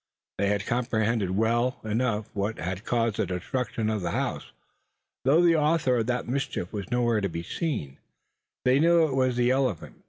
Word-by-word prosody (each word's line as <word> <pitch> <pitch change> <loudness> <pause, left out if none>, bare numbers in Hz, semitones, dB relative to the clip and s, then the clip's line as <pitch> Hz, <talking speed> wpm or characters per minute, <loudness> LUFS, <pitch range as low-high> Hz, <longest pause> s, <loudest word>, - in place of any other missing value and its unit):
They 100 +1 +2
comprehended 110 -2 0
well 120 +3 +1
enough 110 0 0
what 105 +2 -2
had 90 +4 -4
caused 115 -3 0
the - - 0
destruction 110 +5 -2
of 110 -2 -1
the 85 - -2
house. - - -3 0.7
Though 155 +6 +5
the 170 -1 +5
author 150 -4 +2
of 115 -1 -1
that 125 0 -1
mischief 125 -8 -3
was 100 -3 -5
nowhere 120 -3 +1
to 100 - -1
be 85 0 -5
seen, 105 - -3 0.7
they 130 +2 +4
knew 170 +1 +5
it 145 - -2
was 130 -2 +1
the 120 0 +2
elephant. 130 - -1
115 Hz, 175 wpm, -27 LUFS, 105-130 Hz, 0.7 s, Though